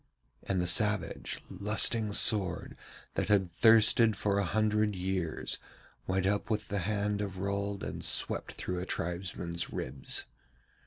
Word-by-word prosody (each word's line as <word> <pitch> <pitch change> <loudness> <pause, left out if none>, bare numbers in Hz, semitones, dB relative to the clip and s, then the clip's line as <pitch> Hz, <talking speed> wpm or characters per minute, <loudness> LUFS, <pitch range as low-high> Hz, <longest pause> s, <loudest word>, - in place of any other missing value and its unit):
And 95 -2 -2
the 90 - 0
savage, 105 +2 +2
lusting 105 +2 +1
sword 95 -5 +2 0.4
that - - -1
had 95 -4 +2
thirsted 110 +1 +5
for 100 -1 0
a - - +1
hundred 105 +2 +1
years 90 -3 -2 0.5
went 95 0 0
up 100 +2 0
with 110 -1 -2
the 100 - -1
hand 105 +2 -1
of 100 -2 -4
Rold 100 +1 -3
and - - -5
swept - - -1
through 90 -1 -4
a 90 - -4
tribesman's 85 0 -3
ribs. 65 0 -2
100 Hz, 140 wpm, -31 LUFS, 90-105 Hz, 0.5 s, thirsted